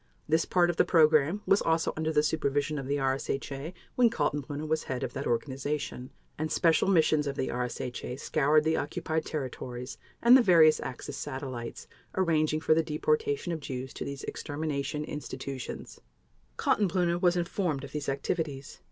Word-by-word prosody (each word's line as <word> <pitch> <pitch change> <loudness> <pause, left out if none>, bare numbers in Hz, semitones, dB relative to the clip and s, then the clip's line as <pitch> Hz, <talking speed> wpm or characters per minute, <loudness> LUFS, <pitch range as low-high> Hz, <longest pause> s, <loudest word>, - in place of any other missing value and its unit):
This 160 +1 +2
part 175 -1 +3
of 170 - -10
the - - +6
program 155 +3 +4
was 195 - +4
also 165 0 +1
under 160 0 -1
the 150 -1 +3
supervision 145 -1 0
of 135 - -6
the 140 - 0
RSHA 135 +2 -2 0.2
when 245 -2 +5
Kaltenbrunner 150 - -2
was 155 0 0
head 130 0 -3
of - - -3
that 140 - -3
organization, 135 +1 -2 0.3
and 155 0 -2
special 165 +2 +3
missions 155 -5 +3
of 140 - -2
the 130 - -2
RSHA 125 +1 -4
scoured 150 +1 +3
the 160 +1 +1
occupied 155 +2 -2
territories 125 -3 -5 0.2
and 240 +2 +7
the 265 - +8
various 165 -7 +6
Axis 125 - -6
satellites 130 -4 -6 0.3
arranging 155 -4 +2
for 160 - +4
the 165 - +3
deportation 420 - 0
of 160 - -3
Jews 130 -2 -6
to - - -5
these 140 0 -6
extermination 150 -1 -3
institutions. 135 -3 -6 0.6
Kaltenbrunner 180 -3 +1
was 180 -1 +3
informed 175 -5 -1
of 140 - -8
these 150 -2 -3
activities. 140 0 -3
150 Hz, 160 wpm, -29 LUFS, 135-165 Hz, 0.6 s, the